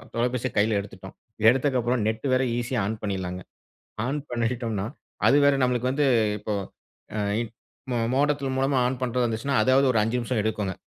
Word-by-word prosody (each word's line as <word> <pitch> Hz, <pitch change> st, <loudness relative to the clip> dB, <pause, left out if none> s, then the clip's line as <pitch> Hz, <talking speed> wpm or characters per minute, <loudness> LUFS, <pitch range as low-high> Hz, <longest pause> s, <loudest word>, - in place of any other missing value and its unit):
தொலைபேசிய 125 Hz, +1 st, 0 dB
கையில 105 Hz, +1 st, +3 dB
எடுத்துட்டோம். 95 Hz, -1 st, -11 dB, 0.3 s
எடுத்ததுக்கப்புற 125 Hz, -1 st, +3 dB
நெட் 110 Hz, +4 st, -2 dB
வேற 130 Hz, +1 st, +3 dB
ஈஸியா 120 Hz, 0 st, -1 dB
ஆன் 110 Hz, +2 st, -3 dB
பண்ணிடலாங்க. 95 Hz, -3 st, -3 dB, 0.7 s
ஆன் 145 Hz, +3 st, -1 dB
பண்ணிட்டோனா, 115 Hz, -4 st, -1 dB, 0.4 s
அது 140 Hz, -, +6 dB
வேற 140 Hz, -, +5 dB
நமலுக்கு 125 Hz, 0 st, 0 dB
வந்து 145 Hz, 0 st, +2 dB, 0.3 s
இப்போ 105 Hz, -, -4 dB, 0.6 s
ஆ -, -, -1 dB, 1.0 s
மோடத்தின் 140 Hz, -1 st, +1 dB
மூலமா 135 Hz, 0 st, +2 dB
ஆன் 125 Hz, 0 st, -2 dB
பண்றதா 125 Hz, 0 st, 0 dB
இருந்துச்சுனா, 115 Hz, +5 st, -2 dB
இதாவது 130 Hz, +2 st, +4 dB
ஒரு 110 Hz, -, +2 dB
ஐஞ்சு 115 Hz, +3 st, 0 dB
நிமிஷம் 120 Hz, -1 st, -1 dB
எடுக்குங்க. 105 Hz, -3 st, -1 dB
120 Hz, 150 wpm, -25 LUFS, 110-130 Hz, 1.0 s, அது